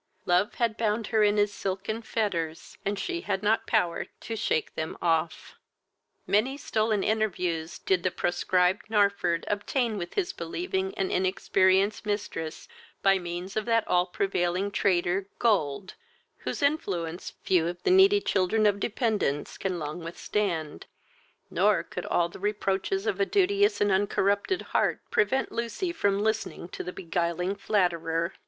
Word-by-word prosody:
Love 180 +3 +2
had 230 -2 0
bound 220 0 0
her 220 0 +1
in 210 0 +4
his 205 0 +2
silken 200 +4 -3
fetters, 170 -9 -2
and 200 +1 -1
she 345 - -3
had 190 - -2
not 215 +2 +2
power 175 -7 +1
to 225 - -5
shake 160 -7 -1
them 160 - -4
off. 165 -1 -1 0.7
Many 245 +7 +2
stolen 215 -6 0
interviews 180 -7 -1
did 185 -2 +1
the 185 - +1
proscribed 180 +2 +1
Narford 200 -5 +2
obtain 215 +2 -1
with 175 -1 -6
his 380 -3 0
believing 375 - -3
and 190 - -1
inexperienced 190 +2 +2
mistress 205 -6 -4 0.4
by 195 -1 +5
means 175 +2 -6
of 215 - -1
that 230 -2 +2
all 180 0 +3
prevailing 185 +1 0
traitor, 190 0 +1
gold, 190 -7 +1 0.4
whose - - -4
influence 185 - -1
few 175 -3 +2
of 175 +1 -5
the - - +3
needy 390 +2 +6
children 205 - +1
of 205 -1 +3
dependence 210 - -1
can 185 -2 -2
long 155 +1 -5
withstand; 165 - -3 0.6
nor - - +3
could - - -6
all 170 - +2
the 170 - -12
reproaches 195 -1 -1
of 200 - -1
a 200 - +3
duteous 405 +2 +3
and 205 -1 +3
uncorrupted 200 - +1
heart - - +2
prevent 270 -12 +1
Lucy 235 +10 -2
from 205 - +1
listening 220 -5 -2
to - - -6
the 180 - -5
beguiling 175 +1 -1
flatterer. 170 -4 0
200 Hz, 150 wpm, -27 LUFS, 175-220 Hz, 0.7 s, needy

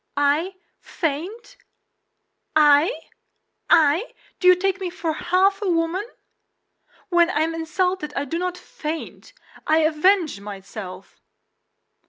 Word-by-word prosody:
"I 300 +6 +1 0.2
faint? 375 - -5 1.0
I? 300 +7 +4 0.7
I? 320 +8 +3 0.2
Do 365 - +2
you 365 - +8
take 390 +1 -1
me 370 - -2
for 340 -2 -3
half 385 +5 +1
a 405 - -1
woman? 340 +5 0 1.0
When 345 -1 +4
I 305 -5 0
am 325 +1 0
insulted 330 0 -2
I 280 - -1
do 330 +5 -3
not 360 0 -3
faint; 320 +4 -7 0.4
I 315 +1 +4
avenge 315 - +2
myself!" 195 -1 -9
330 Hz, 115 wpm, -22 LUFS, 300-370 Hz, 1.0 s, you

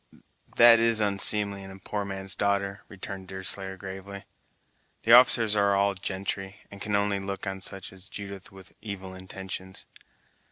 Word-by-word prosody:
"That 115 -1 +7
is 115 -1 +6
unseemly 100 -1 +4
in 95 - -10
a 95 - -11
poor 100 +2 -5
man's 95 -1 -5
darter," 100 -1 -2
returned 95 -1 -9
Deerslayer 95 0 0
gravely, 95 +1 -9 0.8
"the 115 - +4
officers 120 -3 +6
are 100 -1 +2
all 100 0 +1
gentry, 95 0 -5 0.2
and 100 -1 -12
can 105 -1 -2
only 100 -1 0
look 95 0 -6
on 95 -1 -5
such 95 -1 -2
as 95 0 -10
Judith 100 -1 -9
with 95 -1 -13
evil 95 -3 -7
intentions." 95 0 -8
100 Hz, 155 wpm, -26 LUFS, 95-100 Hz, 0.8 s, That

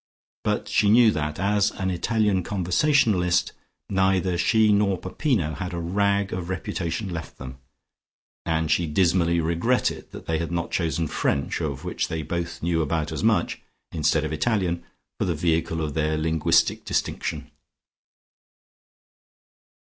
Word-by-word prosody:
But - - -1
she 100 - +2
knew 115 +1 +6
that, 75 -4 -3
as 100 +2 +2
an 95 -1 -2
Italian 105 +1 +1
conversationalist, 95 - +2 0.4
neither 95 -2 +1
she 105 +5 +3
nor 100 -2 +2
Peppino 95 - -1
had 90 0 -5
a - - -3
rag 100 +3 0
of 90 -1 -4
reputation 95 0 -3
left 80 -2 -6
them, 65 0 -9 0.8
and 80 -2 0
she 85 +2 +2
dismally 85 +1 +2
regretted 85 +10 0
that - - -10
they 80 -1 -1
had 85 0 -3
not 85 -1 -2
chosen 85 -1 0
French, 70 -1 -1
of - - -3
which - - -2
they 80 -1 -3
both 85 +2 -4
knew 85 -1 +1
about 80 0 -1
as - - -4
much, - - +1 0.3
instead 75 -1 +1
of 75 - -3
Italian, 90 -1 0 0.4
for - - +1
the 85 -3 0
vehicle 80 0 0
of 75 -2 -3
their 80 0 0
linguistic 80 0 +2
distinction. - - -3
85 Hz, 140 wpm, -24 LUFS, 80-100 Hz, 0.8 s, knew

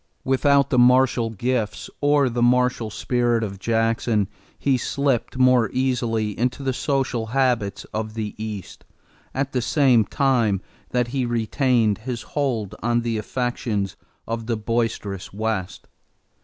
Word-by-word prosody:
Without 140 +1 +3
the 125 - +4
martial 125 -1 +4
gifts 110 -3 -2
or 145 -1 +4
the 120 -1 -2
martial 125 -2 +2
spirit 120 +1 0
of 100 -3 -5
Jackson, 115 -1 +1 0.3
he 135 -2 +2
slipped 130 0 -1
more 125 -4 +4
easily 120 -4 0
into 125 +3 -1
the 135 -1 0
social 130 -4 -1
habits 120 -6 0
of 110 0 -3
the 110 -2 -3
East 105 -4 -7 0.5
at 135 +1 -1
the 125 - 0
same 130 -3 +4
time 115 -4 +1 0.3
that 125 -1 0
he 130 0 -1
retained 120 -1 +1
his 120 0 -5
hold 125 -9 -1
on 120 +1 +1
the 115 -2 -1
affections 110 -4 -2 0.3
of 115 0 -4
the 115 -2 0
boisterous 110 -4 -2
West. 105 -3 -3
120 Hz, 135 wpm, -23 LUFS, 110-130 Hz, 0.5 s, the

